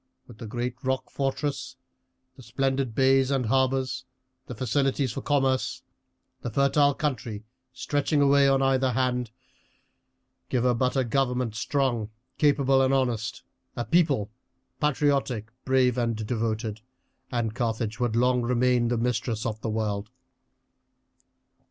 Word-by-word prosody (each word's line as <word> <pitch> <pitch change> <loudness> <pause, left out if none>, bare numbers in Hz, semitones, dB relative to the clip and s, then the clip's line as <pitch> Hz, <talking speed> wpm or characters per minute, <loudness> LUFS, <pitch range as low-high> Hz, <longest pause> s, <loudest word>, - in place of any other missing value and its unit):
With 115 -3 -15
the 115 - -7
great 120 +2 -4
rock 130 0 -2
fortress, 140 0 -2 0.6
the - - -14
splendid 130 0 -1
bays 135 0 +4
and 135 -3 0
harbours, 130 +1 +1 0.4
the 125 - -6
facilities 135 +2 0
for 135 - -5
commerce, 135 -2 0 0.6
the - - -3
fertile 140 +3 +3
country 120 -7 -3 0.3
stretching 145 +3 0
away 140 0 +5
on 135 0 +3
either 130 -1 +2
hand; 125 -1 0 1.2
give 125 -2 +1
her 125 -1 +3
but 125 +3 0
a 130 - +3
government 125 -2 0
strong, 120 -2 -1 0.3
capable, 140 -2 +4
and 135 +1 +3
honest, 120 -4 -1 0.3
a 120 - -3
people 145 - +2 0.5
patriotic, 140 -6 0
brave, 130 -2 +3
and 115 -1 0
devoted, 110 -1 -2 0.5
and 120 -3 -1
Carthage 110 -2 -2
would 120 -2 0
long 125 +1 +3
remain 125 0 +2
the 120 0 0
mistress 115 -1 -1
of 110 -1 -3
the 115 - -2
world." 105 -1 -2
125 Hz, 130 wpm, -26 LUFS, 115-135 Hz, 1.2 s, away